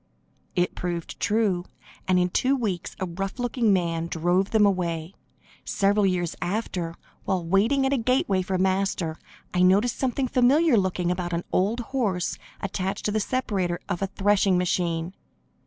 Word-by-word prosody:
It 175 0 +1
proved 175 -2 -4
true, 205 -5 +1 0.4
and 185 -1 +3
in 180 0 +2
two 265 +8 +2
weeks 205 -9 -3
a 190 - -1
rough 190 +2 -4
looking 245 -3 +1
man 170 -3 0
drove 175 +4 +1
them 220 -2 +4
away. 170 -3 -1 0.5
Several 200 0 +2
years 175 -3 -1
after, 180 -4 -2 0.3
while 185 -3 -1
waiting 220 +10 +3
at 265 - +1
a - - +2
gateway 230 -5 +1
for 185 +1 -2
Master, 185 -3 0 0.3
I 180 - +2
noticed 200 +6 +3
something 260 0 0
familiar 265 +5 +4
looking 185 -3 +1
about 175 -1 -3
an 170 +1 -1
old 210 +6 +1
horse 200 -10 -1 0.2
attached 195 +1 -3
to 210 - +1
the 215 - +1
separator 200 -7 -1
of 175 - -3
a 195 - +1
threshing 195 -1 +2
machine. 175 -1 -1
190 Hz, 155 wpm, -25 LUFS, 175-215 Hz, 0.5 s, them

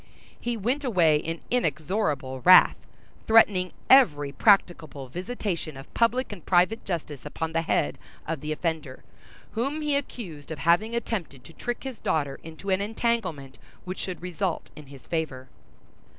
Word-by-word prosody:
He 240 -1 -2
went 250 +8 -1
away 175 - +4
in 165 +2 -4
inexorable 155 - -1
wrath; 185 +5 +8 0.5
threatening 200 -5 +5 0.2
every 150 - +5
practicable 160 - +2
visitation 180 - -4
of 135 - -12
public 240 +2 +1
and 190 -6 -9
private 185 +5 +2
justice 155 -6 -4
upon 160 +2 -4
the 165 - +2
head 75 - 0 0.3
of 160 -3 -3
the 150 - -4
offender, 155 -4 -3 0.5
whom 275 +7 -2
he 295 -1 +1
accused 190 - -5
of 160 - -5
having 175 +10 +2
attempted 180 - -4
to 165 - -14
trick 240 +8 -4
his 265 -3 -6
daughter 145 -3 -1
into 165 +5 -6
an 190 +1 +2
entanglement 200 - -2 0.3
which 185 +1 -5
should 180 -3 -5
result 180 0 -3
in 150 -2 -12
his 135 -2 -13
favor. 140 -6 -3
175 Hz, 150 wpm, -26 LUFS, 150-220 Hz, 0.5 s, wrath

